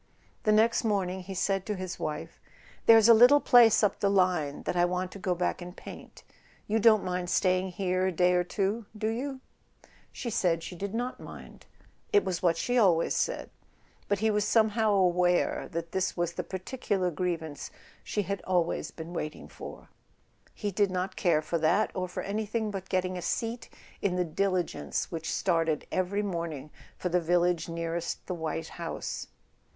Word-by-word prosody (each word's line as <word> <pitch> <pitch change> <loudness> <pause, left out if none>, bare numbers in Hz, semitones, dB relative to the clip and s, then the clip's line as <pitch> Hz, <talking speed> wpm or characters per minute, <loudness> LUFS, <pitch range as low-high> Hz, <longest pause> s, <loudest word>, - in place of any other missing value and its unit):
The 215 - +4
next 225 +3 +3
morning 190 -4 0
he 190 +1 -7
said 195 +1 0
to 210 - -1
his 185 -1 -6
wife: 150 -1 -5 0.5
"There's 225 -1 +8
a 235 - +9
little 245 +6 +7
place 235 -5 +6
up 210 - +2
the 200 - +2
line 180 -7 +1
that - - -2
I 175 - +3
want 180 +1 -1
to 200 - -9
go 185 -1 0
back 180 +1 -1
and 175 +1 -9
paint. - - -11 0.4
You 220 +2 +1
don't 220 -2 +5
mind 180 -1 -2
staying 185 0 +1
here 185 0 0
a - - +1
day 180 +1 +3
or 180 0 +3
two, 200 +4 -2
do 215 +1 -1
you? 260 +4 -4 0.4
" - - -28
She 235 - -5
said 170 -4 +1
she 180 - -7
did 200 +4 -5
not 245 +2 -3
mind; - - -12 0.4
it 205 - +4
was 185 -2 -2
what 170 -2 +2
she 245 +8 +1
always 175 -7 +3
said; - - -2 0.6
but 205 - +1
he 220 +2 +1
was 210 0 +1
somehow 220 0 +3
aware 180 -2 +2
that 165 0 -4
this 190 -1 -1
was 175 0 -1
the - - -3
particular 190 -1 -2
grievance 160 -3 -3 0.3
she 205 - -1
had 200 +1 -3
always 175 -2 0
been 165 +1 -9
waiting 155 -3 -5
for. - - -10 0.7
He 205 -2 -3
did 200 +1 +2
not 185 +1 -3
care 155 -4 +2
for 165 +2 -1
that, 175 +7 +2
or 185 0 -2
for 180 - -5
anything 215 +1 -2
but 190 -2 -6
getting 185 -1 -1
a - - -6
seat 230 +6 -3 0.3
in 185 -3 0
the 180 0 +1
diligence 185 +1 -1
which 160 -2 -4
started 165 -4 0
every 185 +3 0
morning 165 -6 -4 0.3
for 180 - -2
the 180 +1 +2
village 175 0 +1
nearest 170 0 -3
the 185 - -3
white 160 -1 -4
house. 170 -1 -5
185 Hz, 185 wpm, -29 LUFS, 175-205 Hz, 0.7 s, a